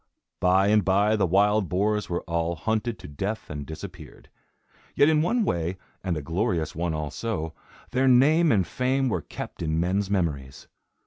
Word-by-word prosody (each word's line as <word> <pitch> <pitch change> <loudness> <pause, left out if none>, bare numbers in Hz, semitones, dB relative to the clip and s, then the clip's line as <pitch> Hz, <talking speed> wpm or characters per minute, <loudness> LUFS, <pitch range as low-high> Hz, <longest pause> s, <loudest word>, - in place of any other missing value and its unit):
By 95 +2 +3
and 105 -1 +4
by, 100 +4 +3
the 100 -3 +1
wild 100 +2 +3
boars 105 +3 0
were 85 - -2
all 85 0 -1
hunted 110 +6 -2
to - - -10
death 95 +10 -4
and 75 -1 -6
disappeared. 85 0 -10 0.7
Yet 145 - +5
in 155 -1 +3
one 220 +7 +1
way, 85 - -1 0.3
and 90 -4 -1
a 75 - -5
glorious 85 0 -1
one 85 0 -2
also, 80 +2 -3 0.4
their 130 +1 +2
name 150 +6 +5
and 100 -5 +3
fame 130 +4 0
were 90 - -1
kept - - -8
in 80 -1 0
men's 95 +3 0
memories. 75 -9 -2
95 Hz, 170 wpm, -26 LUFS, 85-110 Hz, 0.7 s, Yet